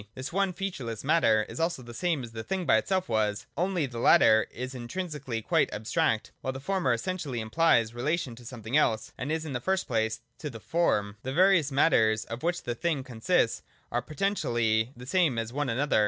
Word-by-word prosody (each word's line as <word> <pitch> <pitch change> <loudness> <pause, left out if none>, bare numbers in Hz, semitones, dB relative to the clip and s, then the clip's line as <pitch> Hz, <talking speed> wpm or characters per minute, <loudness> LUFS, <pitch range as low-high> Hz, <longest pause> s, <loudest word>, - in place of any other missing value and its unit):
This 130 +5 -6
one 195 0 +2
featureless 140 - -5
Matter 115 -8 +3
is - - -8
also 165 -5 -1
the 120 0 -10
same 160 +1 -1
as 115 - -8
the 115 0 -6
Thing 190 +3 -2
by - - +5
itself 185 -1 0
was: 105 -2 0
only 180 0 0
the 120 -3 -6
latter 110 -1 +5
is 130 +2 -6
intrinsically 130 -2 -4
quite - - +2
abstract, 110 +1 0
while 130 - -2
the 135 - -6
former 180 -2 0
essentially 140 0 -2
implies 115 -1 +2
relation 140 +1 -1
to 120 - -13
something 120 0 -5
else, 115 -7 +2
and 145 +4 -4
in 160 -2 -2
the 125 - -1
first 190 +6 0
place 110 -3 -1 0.2
to 150 - -4
the 115 -4 -9
Form. 105 -9 0
The 130 - -4
various 175 -4 +4
matters 110 -6 +3
of 115 +2 -6
which 175 +2 -1
the 120 - -2
thing 145 +2 -1
consists 120 -4 +1 0.3
are - - 0
potentially 120 - 0
the 125 - -9
same 155 -3 +2
as 115 +1 -3
one 145 -1 -1
another. 135 +2 +1
130 Hz, 200 wpm, -28 LUFS, 115-165 Hz, 0.3 s, by